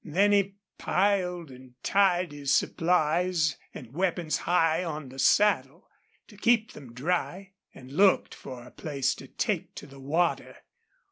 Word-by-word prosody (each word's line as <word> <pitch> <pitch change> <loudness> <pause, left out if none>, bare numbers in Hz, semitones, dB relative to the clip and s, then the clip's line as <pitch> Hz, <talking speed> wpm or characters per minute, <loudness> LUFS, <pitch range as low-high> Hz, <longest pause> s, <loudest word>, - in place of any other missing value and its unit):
Then 195 +6 +2
he 200 -1 +2 0.2
piled 180 -5 0
and 130 -1 -15
tied 185 -4 +2
his 145 -1 -3
supplies 165 -1 +1
and 125 -1 -11
weapons 175 -1 -1
high 165 -1 +3
on 155 -5 -5
the 135 +1 -11
saddle, 160 -1 +2 0.4
to 210 - -16
keep 230 0 +2
them 130 -5 -12
dry, 180 +6 -2 0.2
and 130 0 -13
looked 190 +6 +3
for 125 -3 -9
a 125 - -14
place 135 -3 -2
to - - -11
take - - -3
to - - -8
the 135 -1 -14
water. 160 +6 -1
165 Hz, 145 wpm, -27 LUFS, 140-185 Hz, 0.4 s, high